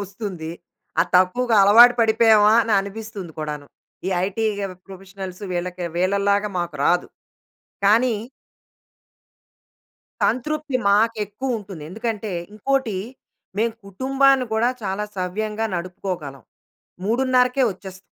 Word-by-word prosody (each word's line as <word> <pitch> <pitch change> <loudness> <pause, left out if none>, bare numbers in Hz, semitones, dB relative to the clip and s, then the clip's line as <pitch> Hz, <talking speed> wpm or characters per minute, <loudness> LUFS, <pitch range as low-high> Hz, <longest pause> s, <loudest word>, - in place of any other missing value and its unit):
ఒస్తుంది. 195 -5 -6 0.5
ఆ - - +7
తక్కువగా 220 +6 +2
అలవాటు 235 +5 +8
పడిపోయామా 220 -2 +5
అని 225 - -1
అనిపిస్తుంది 200 -3 -7
కూడాను. 150 -2 -5 0.4
ఈ - - 0 0.2
ఐటీ 210 +3 -3 0.4
ప్రొఫెషనల్స్ 190 0 -9
వీళ్ళకి 180 0 -3
వీళ్ళలాగా 200 +3 +1
మాకు 175 -4 -3
రాదు. 175 0 +2 0.8
కానీ 230 +4 +4 2.1
సంతృప్తి 300 +2 0
మాకెక్కువుంటుంది. 210 - -1
ఎందుకంటే 220 0 -4 0.2
ఇంకోటి 235 -1 -1 0.6
మేము 225 +1 +1
కుటుంబాన్ని 265 +5 +2
గూడా 230 +3 +2
చాలా 195 +1 -2
సవ్యంగా 210 +4 -2
నడుపుకోగలం. 175 -5 -5 0.6
3:30కె 250 +3 +2
ఒచ్చేస్తాం. 190 0 -12
210 Hz, 90 wpm, -22 LUFS, 185-230 Hz, 2.1 s, అలవాటు